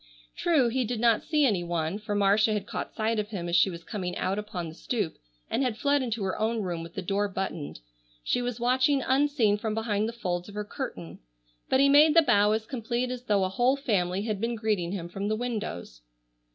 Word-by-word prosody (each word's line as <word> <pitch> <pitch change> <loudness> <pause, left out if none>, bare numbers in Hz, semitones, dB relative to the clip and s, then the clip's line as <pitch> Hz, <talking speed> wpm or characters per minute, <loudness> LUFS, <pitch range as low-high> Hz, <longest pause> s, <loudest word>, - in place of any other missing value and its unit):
True, 295 -8 +2
he 255 +2 0
did 240 0 -3
not 230 -1 +3
see 300 -2 +2
any 200 -8 +1
one, 170 +2 -2
for 210 -1 -3
Marcia 205 +2 +3
had 210 - -2
caught - - -5
sight 220 0 0
of 210 - -2
him 190 -5 -5
as 170 - 0
she 180 +2 +5
was 170 -2 -8
coming 180 -4 -4
out 195 +2 -1
upon 185 -5 -5
the 160 - -8
stoop 200 -1 -3 0.3
and - - -1
had 250 -5 0
fled 285 +2 +2
into 230 -4 -2
her 190 -1 -2
own 220 0 0
room 175 -3 -3
with 165 0 -10
the 190 - -4
door 200 +3 0
buttoned, 185 - -5 0.4
she 245 - 0
was 245 -1 -3
watching 260 +3 +2
unseen 260 -6 +2
from 215 0 -2
behind 220 -1 0
the - - -7
folds 180 -5 -3
of 205 - -11
her 210 0 -3
curtain, 210 - -6 0.5
but 260 - +3
he 280 - +6
made 300 +2 +6
the 330 - +7
bow 210 -6 +4
as 220 0 0
complete 245 0 -2
as 250 0 -6
though 205 -3 +2
a 185 - 0
whole 245 +8 +2
family 195 -8 0
had 210 -3 -3
been 235 +1 -1
greeting 210 -6 -1
him 180 -4 -4
from 195 +3 -4
the 215 - +1
windows. 210 - -5
215 Hz, 230 wpm, -27 LUFS, 190-245 Hz, 0.5 s, the